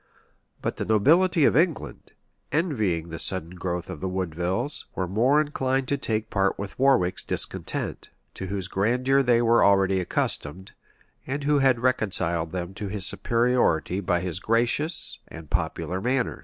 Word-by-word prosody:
But - - -2
the - - -3
nobility 160 - +4
of - - +3
England, 165 +1 -1 0.4
envying 110 - -1
the 80 - -6
sudden 90 -3 -1
growth 90 -1 -4
of 95 -5 -7
the 95 - -3
Woodevilles,[] 95 - -1
were 95 - -2
more 120 +10 +3
inclined 135 -3 -1
to 140 - +2
take 110 -3 -1
part 100 -1 +1
with 100 +3 -7
Warwick's 130 -10 +2
discontent, - - -1 0.2
to 95 - -6
whose 95 -1 -3
grandeur 125 +8 +1
they 120 -2 +3
were 115 0 +4
already 95 -1 +3
accustomed, 90 0 -3 0.6
and 140 +2 -3
who 145 0 +2
had 130 -3 +3
reconciled 85 -9 0
them 90 0 -5
to 105 +1 -6
his 100 -1 0
superiority 115 -7 +1
by 90 -3 0
his 90 -1 -4
gracious 120 - 0
and 80 -3 -12
popular 95 +1 -2
manners. 125 +2 -1
105 Hz, 155 wpm, -25 LUFS, 90-130 Hz, 0.6 s, nobility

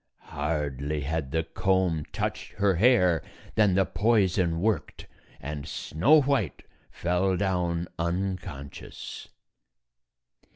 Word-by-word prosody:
Hardly 75 -1 -2
had 75 0 -2
the 80 +1 +1
comb 90 -3 0
touched - - -3
her 100 -1 +2
hair 90 - +4 0.3
than 105 -4 +3
the 95 0 +4
poison 95 -7 +2
worked, 110 +2 -1 0.3
and 75 +1 -6
Snow 135 - +3
White 130 - 0 0.3
fell 90 +2 0
down 90 -3 0
un 90 +3 0
conscious. 70 -7 -9
90 Hz, 100 wpm, -27 LUFS, 75-95 Hz, 0.3 s, hair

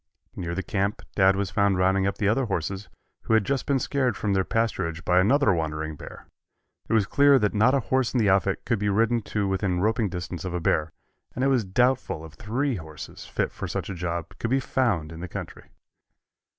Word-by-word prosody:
Near 85 -1 -4
the 95 - -2
camp 100 +2 -2
Dad 95 -1 +5
was 100 -1 -2
found 100 0 +2
rounding 95 +1 +2
up 100 - -2
the 105 - 0
other 120 +5 +2
horses, 95 0 -3 0.4
who 110 - +3
had 110 -3 +3
just 140 +2 -1
been 140 -1 +3
scared 130 -4 0
from 105 -2 -1
their 95 -1 +2
pasturage 90 -7 -1
by 90 0 +4
another 115 +3 +4
wandering 80 -1 -3
bear. - - -11 0.6
It - - 0
was 110 -3 +4
clear 140 +3 +5
that 105 -5 +1
not 115 +6 +4
a 135 - +2
horse 130 +1 0
in 125 - +1
the 110 - +3
outfit 95 0 +2
could 115 -4 0
be 105 0 0
ridden 115 +3 +2
to 105 -1 -2
within 95 -2 0
roping 110 +2 +1
distance 90 -2 -5
of 90 -2 -4
a - - 0
bear, 80 -1 +1 0.4
and 130 - -1
it 135 - +3
is 125 -4 +2
doubtful 120 -4 0
if 80 - -12
three 120 - -2
horses 80 -2 -9
fit - - -1
for - - -6
such - - -4
a - - -3
job 85 -2 -4
could 115 - -2
be 135 +2 +2
found 110 -13 0
in 80 - -9
the 90 - -5
country. - - -8
100 Hz, 220 wpm, -25 LUFS, 90-115 Hz, 0.6 s, Dad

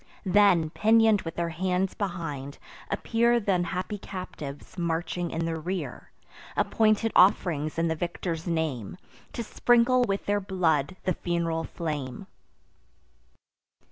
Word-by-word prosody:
Then, 185 -5 +4
pinion'd 220 0 +4
with 165 0 -6
their 170 -1 -1
hands 185 +2 -1
behind, 165 -8 -4 0.3
appear 235 +1 +2
Th' 205 -2 -5
unhappy 185 +2 -1
captives, 180 -4 -8
marching 170 0 -2
in 165 +1 -2
the 165 -1 -2
rear, 165 -5 -5 0.5
Appointed 220 0 +2
off'rings 165 -5 +3
in 165 0 +2
the 160 - +1
victor's 170 0 -4
name, 160 - -2 0.4
To 235 - -3
sprinkle 245 +3 +3
with 195 -2 -2
their 205 0 +1
blood 170 -5 0
the 185 - +1
fun'ral 165 -1 -1
flame. 150 -1 -4
175 Hz, 120 wpm, -27 LUFS, 160-200 Hz, 0.5 s, Then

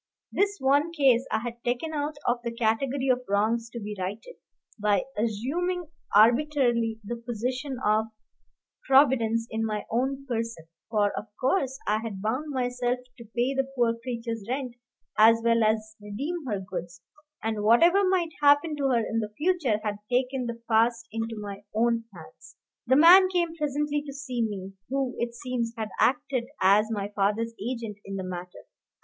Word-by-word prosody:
This 405 0 +1
one 285 +5 +2
case 270 -6 +3
I 220 - +1
had 235 0 -7
taken 250 +7 -2
out 295 0 -2
of 240 0 +1
the 235 - -2
category 245 +4 0
of 250 0 +3
wrongs 225 +3 +1
to 235 - -7
be 210 -1 -5
righted, 205 - -5 0.5
by 205 -2 +2
assuming 295 - -2 0.3
arbitrarily 235 -1 +3
the 240 +4 -4
position 250 +4 -3
of 215 +1 +3 0.8
Providence 245 -5 +4
in 220 0 -1
my 215 -2 -2
own 265 +4 -1
person, 230 -8 -3 0.2
for, 210 -2 +2
of 220 - -5
course, 265 -1 +1
I 215 +1 +1
had 220 -4 -6
bound 250 +9 -2
myself 250 -2 -1 0.2
to 235 - -10
pay 245 +3 +1
the 270 0 0
poor 235 -2 +2
creature's 230 -2 -5
rent 255 -1 -2 0.5
as 225 +1 +7
well 230 -1 +3
as 215 0 0
redeem 275 +10 -4
her 205 -4 -1
goods, 175 -2 -7 0.4
and, 220 -1 -1
whatever 335 - +5
might 370 -3 +1
happen 290 +2 +4
to 280 - -1
her 235 -3 +2
in 225 - -1
the 215 -2 -3
future, 305 - +1
had 210 -1 -2
taken 255 0 0
the 235 0 -5
past 230 +1 +2
into 225 0 -4
my 200 -1 -7
own 230 0 +2
hands. 180 +7 -14 0.3
The 260 - +5
man 360 +5 +8
came 345 -3 0
presently 295 -1 -1
to 280 - -6
see 260 -3 -4
me, 195 -3 -3 0.2
who, 270 -1 -1
it 235 0 -2
seems, 235 -2 -3
had 220 -1 -3
acted 255 -1 +1
as 205 +3 +4
my 205 -2 -3
father's 210 +3 0
agent 230 -3 -4
in 195 - -6
the 190 - -3
matter. 180 -1 -7
235 Hz, 165 wpm, -27 LUFS, 220-270 Hz, 0.8 s, man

